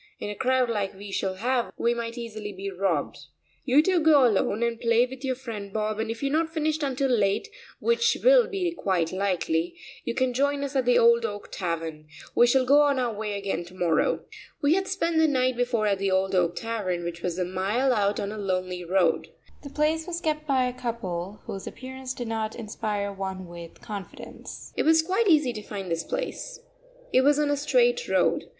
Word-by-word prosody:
In 205 - -4
a - - -6
crowd 255 +2 +2
like 205 -4 -2
we 200 +1 -9
shall 190 -1 -1
have 240 +4 0
we 235 - +2
might 235 0 -5
easily 215 -3 -6
be 195 0 -6
robbed. 180 -6 -1 0.5
You 280 +3 +5
two 370 0 +3
go 305 -4 +6
alone 215 0 +1
and 235 -1 -1
play 230 +1 +4
with 260 +1 -10
your 260 -1 0
friend 225 -6 -7
Bob, 215 +1 -2
and 225 0 -2
if 225 +3 -5
you 275 - +1
are 310 - +3
not 325 -1 -2
finished 315 -1 -1
until 275 -1 0
late, 215 - +1 0.3
which 465 0 +2
will - - +6
be 370 -3 -1
quite 185 - 0
likely, 175 -3 -1 0.3
you 235 - -3
can 260 -1 +1
join 280 +2 +1
us 280 0 -4
at 260 -2 +2
the 245 0 +4
Old 235 0 +5
Oak 205 -2 -5
Tavern. 165 -4 -4 0.3
We 240 - +5
shall 255 +1 +3
go 285 +3 +6
on 285 -2 +3
our 245 -3 0
way 210 -1 -3
again 195 -4 -2
to 180 +2 -14
morrow." 170 -4 +1 0.4
We 285 +2 +3
had 385 +1 0
spent 340 -4 0
the 320 - +5
night 255 -3 +1
before 245 -3 0
at 200 -2 +1
the 195 0 0
Old 190 0 +1
Oak 175 -2 +2
Tavern, 205 -7 -2
which 170 0 -5
was 175 -1 -2
a 180 - 0
mile 200 +9 +1
out 205 -2 +1
on 200 - -3
a 215 - -6
lonely 185 -2 -2
road. 180 -1 +2 0.3
The 280 - -9
place 310 +3 0
was 340 -1 -3
kept 305 -2 -2
by 265 -3 +3
a 250 - -2
couple 210 -6 -4
whose 195 - -6
appearance 260 0 -7
did 245 - -5
not 220 -1 -2
inspire 210 -2 -3
one 190 -1 -5
with 170 -1 -11
confidence. 210 -6 -9
It - - +1
was 320 0 +4
quite 385 +6 +1
easy 300 -8 +4
to 215 - -6
find 195 -3 -6
this 165 0 -1
place. - - -4 0.5
It 255 - +6
was 290 +2 +4
on 295 -1 +2
a - - +3
straight 485 - +2
road. - - +2
235 Hz, 215 wpm, -26 LUFS, 195-280 Hz, 0.5 s, go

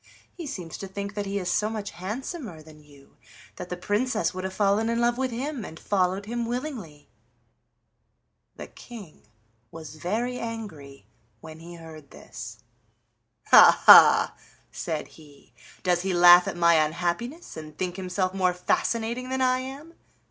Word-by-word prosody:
He 335 -4 -8
seems 175 - -7
to 195 - -6
think 200 +1 -6
that 205 -1 -4
he 200 +1 -2
is 185 -3 -4
so 210 +4 0
much 215 -2 -5
handsomer 210 - -7
than 155 -1 -16
you 140 -2 -21 0.4
that 180 - -8
the 180 - -4
Princess 210 0 -1
would 185 0 -6
have 190 - -3
fallen 205 +2 +1
in 230 0 0
love 240 0 +2
with 260 +1 -1
him 255 +1 -4
and 160 -4 -10
followed 190 0 0
him 235 +1 -3
willingly." 235 - -6 1.5
The - - -8
King 215 -10 -13 0.5
was 155 0 -11
very 230 +10 -2
angry 165 - -8 0.3
when 160 +2 -12
he 170 +1 -11
heard 160 -4 -12
this. 115 -1 -11 0.9
"Ha, - - +7
ha!" - - +8 0.4
said 155 -2 -4
he; 145 -5 -19 0.3
"does 180 -1 +1
he 190 -1 -2
laugh 175 0 +8
at - - -4
my 170 -2 +4
unhappiness, 175 - -4
and 155 -1 -10
think 180 -1 -3
himself 185 0 -2
more 185 -2 +1
fascinating 230 +6 -1
than 260 0 -2
I 255 0 +2
am? 275 +6 -9
190 Hz, 155 wpm, -25 LUFS, 165-235 Hz, 1.5 s, ha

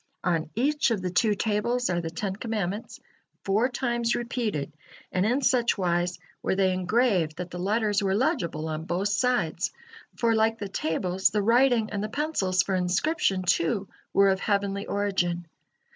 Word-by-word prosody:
On 165 -3 0
each 290 +5 +2
of 210 -5 -1
the 180 - -2
two 210 +4 +2
tables 230 +4 0
are 175 -1 0
the 165 - -4
Ten 190 +3 -3
Commandments, 210 -2 -4 0.4
four 215 +6 +2
times 240 -2 0
repeated, 230 - -2 0.4
and 185 +2 +1
in 260 +5 +1
such 245 -3 +3
wise 175 -1 0 0.2
were - - 0
they 190 -1 +2
engraved 185 -3 +1
that 180 0 -6
the 180 - -6
letters 210 +2 +1
were 195 -1 +1
legible 205 - 0
on 155 0 -4
both 185 +4 -1
sides, 200 -6 0 0.4
for, 230 -1 +2
like 225 0 +2
the 205 - -5
tables, 180 +2 0
the 210 -1 0
writing 235 0 +3
and 205 0 -2
the 215 - -3
pencils 205 - 0
for 195 - -2
inscription, 185 - +1
too, 180 +3 +1 0.2
were 200 0 +5
of 190 0 +1
heavenly 200 -1 -1
origin. 175 -4 -1
200 Hz, 165 wpm, -26 LUFS, 180-230 Hz, 0.4 s, were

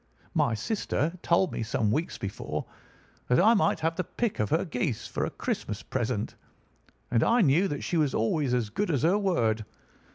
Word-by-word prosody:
"My 115 - +2
sister 160 - -1
had 180 0 -15
told 175 +1 +2
me - - -3
some 110 -1 0
weeks 155 +8 -1
before 100 -1 -4 0.6
that 125 - +4
I 220 +5 +6
might 210 - +2
have 165 +1 0
the 185 - 0
pick 230 +5 -2
of 105 -1 +1
her 165 - +1
geese 125 - -2
for - - -2
a - - -2
Christmas - - -4
present, - - -2 0.8
and 115 -1 +3
I 235 +1 +4
knew 170 +3 +4
that 145 -4 -4
she 175 - -1
was 150 -4 +2
always 130 +4 +1
as 115 -4 -1
good 205 - -1
as 145 -4 +1
her 180 +6 +4
word. 115 - +1
155 Hz, 195 wpm, -28 LUFS, 115-185 Hz, 0.8 s, I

